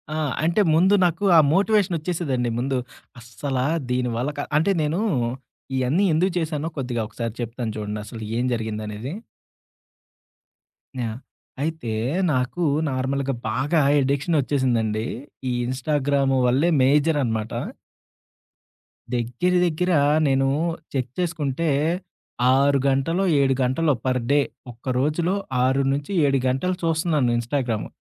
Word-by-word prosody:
ఆ! - - -2 0.3
అంటే 170 +6 +3
ముందు 185 +5 +4
నాకు 175 +3 -1
ఆ - - +9
మోటివేషనొచ్చేసేదండి 175 - +1
ముందు. 130 +1 0 0.4
అస్సలా 125 +2 -3 0.3
దీని 125 -1 0
వల్ల 125 +5 -1
క - - -4 0.2
అంటే 165 +6 +2
నేను 155 +5 0 0.8
ఇయన్నీ 145 +11 +2
ఎందుకు 180 +4 +2
చేశానో 160 -1 -2
కొద్దిగా 125 -3 -2
ఒకసారి 115 0 -5
చెప్తాను 115 -1 -4
చూడండి. 105 0 -4
అసలు 115 -1 -9 0.2
ఏం 125 - 0
జరిగిందనేది? 110 +2 -4 1.9
ఆ! - - -1 0.6
అయితే 160 -7 -3 0.4
నాకు 130 +7 -1 0.3
నార్మల్‌గా 135 +1 -1 0.2
బాగా 135 +8 +1 0.2
అడిక్షనొచ్చేసిందండి. 130 -6 0 0.4
ఈ - - 0
ఇన్‌స్టాగ్రాము 135 +1 0
వల్లే 135 +8 +3
మేజరనమాట. 135 -6 +2 1.6
దెగ్గర 125 +10 0
దెగ్గర 175 +2 0 0.4
నేను 135 0 +2 0.5
చెక్ 130 -2 -2
చేసుకుంటే, 160 -3 -1 0.9
6 140 0 +3
గంటలో, 140 +8 +1 0.2
7 135 -1 +3
గంటలో 140 +4 +2
పర్ 130 0 +1
డే 145 - +5 0.3
ఒక్క 125 +2 -4
రోజులో 165 +6 +1 0.3
6-7 140 +2 +1
గంటలు 160 +9 0
చూస్తున్నాను 160 -6 +1
ఇన్‌‌స్టాగ్రాము. 120 -2 -2
135 Hz, 105 wpm, -23 LUFS, 125-160 Hz, 1.9 s, ఆ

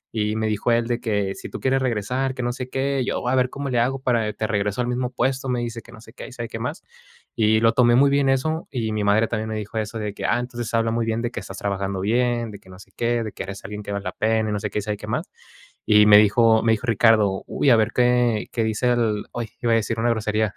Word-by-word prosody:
Y 105 0 0
me 110 - -1
dijo 110 +3 0
él 115 0 +2
de 120 0 -1
que: 100 -3 -1
"Si - - -9
tú - - -7
quieres 135 0 +1
regresar, 130 +3 -1
que 125 - -4
no 120 - -1
sé 125 0 -6
qué, 135 +1 -1
y 125 - -1
yo - - -1
voy 125 - -1
a - - +3
ver 130 -1 +2
cómo 140 0 -5
le 120 - +2
hago 130 +3 0
para 115 -4 0
te 110 - -3
regreso 105 0 -1
al 120 - -1
mismo 125 0 -1
puesto", 130 +1 -1
me 125 -1 0
dice, 115 -1 -5
que 115 - -17
no 110 -2 -13
sé 110 - -16
qué - - -9
y - - -12
sabe 120 -2 -6
qué - - -6
más. - - -5 0.5
Y 110 0 +3
lo 115 0 +5
tomé 120 -1 +4
muy 140 +2 +5
bien 140 -1 +2
eso. 155 +5 0
Y 115 -4 -2
mi 105 - -1
madre, 105 +2 +3
también 110 -1 -3
me 110 - -3
dijo 105 +1 -6
eso 110 +1 -4
de 105 -1 -4
que: - - -6
"Ah, - - +2
entonces 120 -2 -5
habla 115 0 +1
muy 115 0 0
bien 115 +1 -1
de 120 - -2
que - - -5
estás 95 - -9
trabajando 100 -1 -2
bien, 120 +2 0
de 100 - -10
que 95 - -20
no 90 - -12
sé 95 - -16
qué, 120 0 0
de 110 - -5
que - - -8
eres 100 +1 -8
alguien 105 +1 -6
que 100 - -6
vale 100 -1 -3
la - - -3
pena", 110 0 0
y - - -1
no 105 - -1
sé - - -3
qué, - - -2
y - - -3
sabe 105 -1 -3
qué - - -9
más. - - -2 0.6
Y 105 -1 +6
me 105 -1 +8
dijo 110 +1 +4
me 115 -1 +4
dijo 110 +2 -3
Ricardo: 110 -3 +3
"Uy, 140 - +1
a - - +7
ver 110 0 +1
qué 120 -3 +2
qué 115 - -1
dice 110 +3 0
el" 110 -3 0
¡oy!, 120 -2 -4
iba 115 - +2
a - - +5
decir 115 0 -1
una 120 +1 +1
grosería. 110 -1 -1
115 Hz, 300 wpm, -23 LUFS, 105-125 Hz, 0.6 s, me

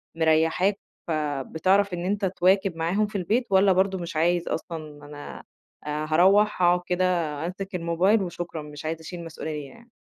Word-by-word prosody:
مريحاك 165 +5 +2 0.3
فبتعرف 160 +6 0
إن 175 0 -3
أنت 200 +1 0
تواكب 190 0 +2
معاهم 175 +6 0
في 205 - -4
البيت 225 +7 0
والَّا 190 0 +5
برضه 190 +1 +1
مش 170 -2 -6
عايز 170 +2 +1
أصلًا 155 -3 -5
أنا 145 0 -9 0.4
آآ، 150 +1 -3
هاروّح 195 +5 +4
أقعد 175 0 +4
كده 180 +1 +1 0.4
أمسك 195 +2 -5
الموبايل 180 +5 +2
وشكرًا 175 -2 -5
مش 150 0 -10
عايز 160 +1 -2
أشيل 170 +2 -8
مسؤولية 155 -3 -6
يعني؟ 235 - -17
175 Hz, 155 wpm, -25 LUFS, 160-195 Hz, 0.4 s, والَّا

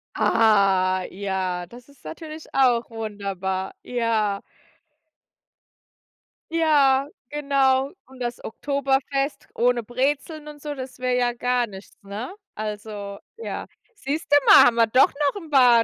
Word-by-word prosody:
Ah, 195 -4 +3
ja, 185 -2 -3
das 240 +6 -14
ist 280 -2 -22
natürlich 310 - -9
auch 245 -3 +3
wunderbar, 200 -4 -4
ja. 225 -4 0 2.1
Ja, 285 -4 +4 0.2
genau. 275 -2 +2 0.2
Und 260 0 -15
das 240 -1 -4
Oktoberfest 275 +2 -1
ohne 245 0 +2
Brezeln 285 +6 -2
und 295 -1 -12
so, 295 0 -5
das 260 -1 -8
wäre 255 0 0
ja 245 -1 +2
gar 245 0 0
nichts, 195 -3 -12
ne? 205 +5 -6 0.3
Also, 210 -1 -6 0.2
ja. 460 - -5 0.3
Siehste 300 -4 -1
mal, - - +9
haben 240 - +4
wir 230 -1 +4
doch 255 +5 +5 0.2
noch 405 - -7
'n 320 - -12
paar 245 -5 +6
245 Hz, 125 wpm, -24 LUFS, 210-275 Hz, 2.1 s, mal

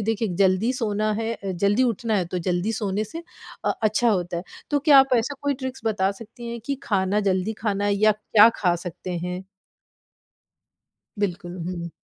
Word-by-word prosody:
है? - - -3
देखिए 225 0 0
जल्दी 190 +6 +3
सोना 215 -4 -1
है 225 +1 -1
अ, 195 -2 -6
जल्दी 205 +5 +3
उठना 230 -2 0
है, 185 - +1
तो 180 +2 -3
जल्दी 180 +5 0
सोने 210 -1 -1
से 325 +11 -8 0.4
अ, - - +2
अच्छा 215 +2 +3
होता 175 -4 -1
है, 170 - -3 0.3
तो 290 - +3
क्या 285 -1 +6
आप 265 -1 +5
ऐसा 250 +5 -2
कोई 285 0 +1
ट्रिक्स 260 0 -5
बता 200 -3 +1
सकती 235 +2 -9
हैं 235 0 -5
कि 280 - 0
खाना 200 0 +1
जल्दी 185 +4 0
खाना 205 -2 0
है 205 - +2
या 215 +1 +4
क्या 210 +1 +5
खा 175 -3 +2
सकते 175 +1 -5
हैं? 180 +2 -4 1.7
बिल्कुल, 180 -2 -3
हुँ, 185 - -3
हुँ। 170 -1 -5
210 Hz, 195 wpm, -24 LUFS, 185-230 Hz, 1.7 s, क्या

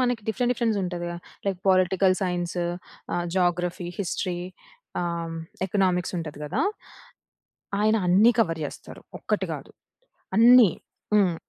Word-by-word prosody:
మనకి 245 -3 +1
different, 245 +2 +1
differents 225 -4 0
ఉంటదిగా! 175 -1 -3 0.3
Like 190 -2 0
political 185 0 +4
science, 175 -1 -1 0.5
ఆహ్, 175 0 0
జాగ్రఫీ, 175 0 0
హిస్టరీ 180 -1 -2 0.6
ఆహ్, 175 - -1
హ్మ్. 165 0 -5 0.3
ఎకనామిక్సుంటది 180 -5 -1
కదా! 185 - -2 1.2
ఆయన 215 +1 +3
అన్నీ 205 +7 +6
కవర్ 165 -7 +1
చేస్తారు. - - -9 0.2
ఒక్కటి - - -1
కాదు, - - -9 0.7
అన్నీ. 235 -3 +8 0.5
హ్మ్. 185 -5 +4
180 Hz, 115 wpm, -25 LUFS, 175-210 Hz, 1.2 s, అన్నీ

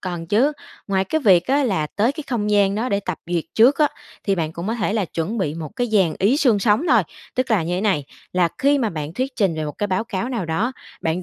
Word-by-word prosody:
còn 175 -3 -5
chứ. 240 - +3 0.3
Ngoài 195 -1 +1
cái 315 +11 -1
việc 185 - +4
á 280 +2 +2
là 190 -11 0
tới 220 - 0
cái 310 -1 -7
không 220 -6 -1
gian 200 -1 +3
đó 230 +4 -1
để 200 -3 0
tập 185 -4 -4
duyệt 175 -2 -1
trước 245 +6 +5
á, 300 -1 +4 0.4
thì 195 - +2
bạn 160 -3 -2
cũng 170 +3 -6
có 225 - -1
thể 210 -3 -1
là 215 -3 +1
chuẩn 170 +6 -3
bị 155 -7 -1
một 160 -2 -5
cái 245 - 0
dàn 190 -7 +3
ý 210 +8 +3
xương 250 -8 +3
sống 210 +5 +2
thôi. - - +5 0.3
Tức 255 0 -1
là 210 -7 +3
như 175 +2 -2
thế 185 - -1
này, 190 -9 +1 0.3
là 180 -2 +3
khi 285 +1 +3
mà 230 -5 0
bạn 155 -2 -5
thuyết 260 +4 -3
trình 195 -6 +2
về 155 -1 -3
một 150 - -4
cái 205 - 0
báo 190 +2 -1
cáo 225 +1 -3
nào 235 -7 -2
đó, 195 +11 -1 0.3
bạn 165 +3 -1
200 Hz, 275 wpm, -21 LUFS, 175-240 Hz, 0.4 s, trước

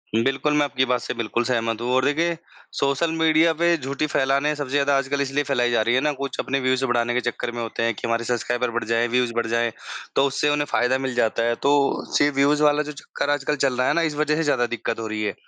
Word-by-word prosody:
बिल्कुल, 135 +5 +1
मैं 150 - +4
आपकी 130 -2 0
बात 125 -1 0
से - - -4
बिल्कुल 115 0 -2
सहमत 115 -2 -1
हूँ 120 - -2
और 130 +1 +2
देखिए 165 +3 +1 0.4
सोशल 140 +4 0
मीडिया 160 +1 +4
पे 170 +2 +2
झूठ 140 0 -6
ही 155 - +4
फ़ैलाने 140 +1 +1
हैं 150 - -1
सबसे 145 -3 -5
ज़्यादा 140 0 +2
आजकल 140 +1 -1
इसलिए 140 +1 0
फ़ैलाई 125 -3 0
जा 120 - +2
रही 120 +3 +1
है 130 - +2
ना 150 +1 +1
कुछ 140 - -4
अपने 135 +1 -1
व्यूज़ 130 0 0
बढ़ाने 120 -1 0
के 125 - 0
चक्कर 120 0 -5
में 120 0 -5
होते 115 0 -3
हैं 115 0 +1
कि - - -12
हमारे 115 0 0
सब्सक्राइबर 120 +1 -1
बढ़ 120 0 -2
जाए, 115 +1 +1
व्यूज़ 125 0 0
बढ़ 115 -1 -1
जाए 115 0 0 0.4
तो 135 - +4
उससे 140 +2 0
उन्हें 145 0 +1
फ़ायदा 125 +2 +2
मिल 130 -1 -3
जाता 115 -1 +1
है। 120 0 +1
तो 140 0 +2
सी 145 - +4
व्यूज़ 145 +2 +2
वाला 150 0 +3
जो 150 - -6
चक्कर 145 0 -5
आजकल 145 +1 0
चल 135 -2 +1
रहा 125 0 +1
है - - +3
ना 170 - +1
इस 155 -3 -1
वज़ह 150 0 +1
से 165 - 0
ज़्यादा 135 -5 +1
दिक्कत 115 -1 -4
हो 110 - -4
रही 110 0 -4
है। 105 - -1
135 Hz, 270 wpm, -23 LUFS, 120-145 Hz, 0.4 s, मैं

